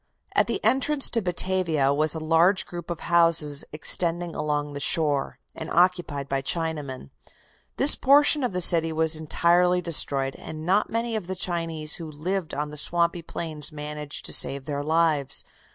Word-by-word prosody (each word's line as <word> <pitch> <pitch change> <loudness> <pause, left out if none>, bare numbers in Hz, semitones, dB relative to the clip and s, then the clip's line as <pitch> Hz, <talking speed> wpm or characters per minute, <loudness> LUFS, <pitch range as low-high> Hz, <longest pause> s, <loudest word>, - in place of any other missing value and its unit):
At - - +2
the - - -4
entrance 275 +2 +2
to 230 - +2
Batavia 175 -6 0
was 155 +2 0
a - - -4
large 165 +5 +2
group 175 -1 -9
of 170 -1 -5
houses 165 -4 +2
extending 170 +2 -2
along 150 -1 -3
the 140 - -6
shore, 145 -2 +1 0.2
and 160 - -8
occupied 175 -6 0
by 135 -1 -2
Chinamen. 145 - -3 0.7
This 275 - +6
portion 290 +1 +4
of 250 - -1
the 180 0 -2
city 165 -2 +5
was 160 0 +1
entirely 175 +3 +1
destroyed, 140 -5 +2
and 155 0 -9
not 195 +4 +1
many 230 0 -2
of 205 -5 -4
the 190 - -4
Chinese 165 -4 -2
who 160 -2 -8
lived 170 +4 -4
on 150 +1 -4
the 150 - -8
swampy 170 +3 +1
plains 160 -2 -7
managed 150 -1 -4
to - - -2
save 135 -1 +2
their 145 0 -4
lives. 155 -3 0
165 Hz, 170 wpm, -24 LUFS, 150-180 Hz, 0.7 s, This